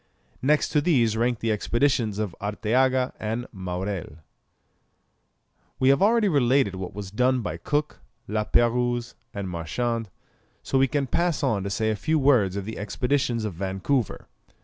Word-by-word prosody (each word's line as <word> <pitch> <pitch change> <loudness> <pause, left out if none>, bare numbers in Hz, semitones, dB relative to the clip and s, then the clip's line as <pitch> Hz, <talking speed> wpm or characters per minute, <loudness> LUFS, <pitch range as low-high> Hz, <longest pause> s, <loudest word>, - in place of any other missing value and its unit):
Next 150 +3 +2
to 150 - +2
these 125 -9 +2
rank 120 0 0
the 115 - 0
expeditions 115 0 +1
of 105 -5 -3
Arteaga 125 +5 +1
and 115 +3 -3
Maurelle. 95 -3 -4 1.6
We 130 - +3
have 140 +5 +4
already 220 +1 +4
related 135 - +3
what 95 -1 -6
was 100 -2 -6
done 125 +4 +2
by 105 - -4
Cook, 150 0 -2 0.3
La 105 +1 0
Pérouse, 120 +1 +1 0.2
and 100 -1 -5
Marchand, 110 +7 -2 0.5
so 135 - +1
we 135 - +4
can 140 +2 0
pass 170 +5 0
on 115 -7 +1
to - - -2
say 110 +1 0
a - - -1
few 155 +8 0
words 125 -10 +3
on 100 - -4
the 110 - -6
expeditions 120 +1 -1
of 105 - -3
Vancouver. 95 +7 -2
120 Hz, 155 wpm, -25 LUFS, 105-135 Hz, 1.6 s, have